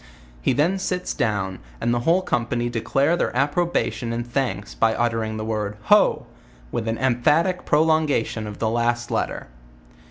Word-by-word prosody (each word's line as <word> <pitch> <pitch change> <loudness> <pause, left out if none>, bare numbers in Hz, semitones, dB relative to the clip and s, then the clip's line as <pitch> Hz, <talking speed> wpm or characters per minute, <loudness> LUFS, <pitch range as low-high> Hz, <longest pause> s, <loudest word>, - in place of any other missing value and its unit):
He - - +2
then 170 +8 +1
sits 180 -1 -2
down, 95 -4 -1 0.2
and 120 - +1
the 120 - +1
whole 170 +9 +2
com 120 -9 0
pany 120 0 -1
declare 135 +7 +1
their 125 - -1
approbation 145 -4 0
and 120 0 -3
thanks 120 -4 -2
by 110 0 +2
uttering 115 -2 -1
the 110 - -4
word 105 -2 -3
ho! - - +4 0.5
with 115 - -3
an 115 0 -1
emphatic 150 +9 +2
prolongation 150 -8 +1
of 105 -1 -7
the 110 - 0
last 120 +1 0
letter. - - -2
120 Hz, 160 wpm, -23 LUFS, 110-150 Hz, 0.5 s, ho